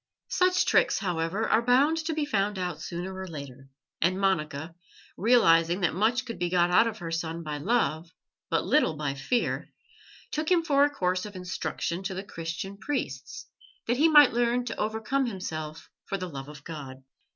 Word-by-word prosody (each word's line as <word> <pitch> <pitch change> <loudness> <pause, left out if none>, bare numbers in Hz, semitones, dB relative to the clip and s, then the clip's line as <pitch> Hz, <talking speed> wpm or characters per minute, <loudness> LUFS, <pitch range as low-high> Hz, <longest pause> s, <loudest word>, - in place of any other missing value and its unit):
Such 365 0 +3
tricks, - - +3
however, 180 +2 -1
are - - +3
bound 265 +7 +3
to 320 -1 -1
be 310 -1 0
found 205 -6 0
out 180 -4 -3
sooner 175 +3 -5
or 190 0 -6
later, 135 -4 -9 0.3
and 185 +3 +2
Monica, 160 -5 -1 0.4
realizing 175 -6 +4
that 180 - +2
much 225 +7 +1
could 230 -2 -7
be 175 0 0
got 175 0 +3
out 225 +5 +5
of 220 -1 -4
her 170 -4 -6
son 165 0 -3
by 150 -1 -4
love, 165 - 0 0.4
but - - +1
little 295 - +3
by 145 -2 -2
fear, 140 - -1 0.6
took 310 +1 -2
him 350 -2 +4
for 285 -3 +4
a - - +1
course 185 -7 -1
of 205 - -12
instruction 180 -1 -3
to 190 0 -4
the 190 - -4
Christian 170 +2 -6
priests, 195 - -4 0.4
that 240 +2 0
he 315 +4 +5
might 295 -5 +7
learn 240 +1 +1
to 230 - -5
overcome 220 +5 0
himself 160 -7 -5 0.2
for 195 - -3
the 185 -1 -4
love 135 -3 -7
of 145 -2 -11
God. 135 -5 -8
185 Hz, 185 wpm, -27 LUFS, 165-235 Hz, 0.6 s, might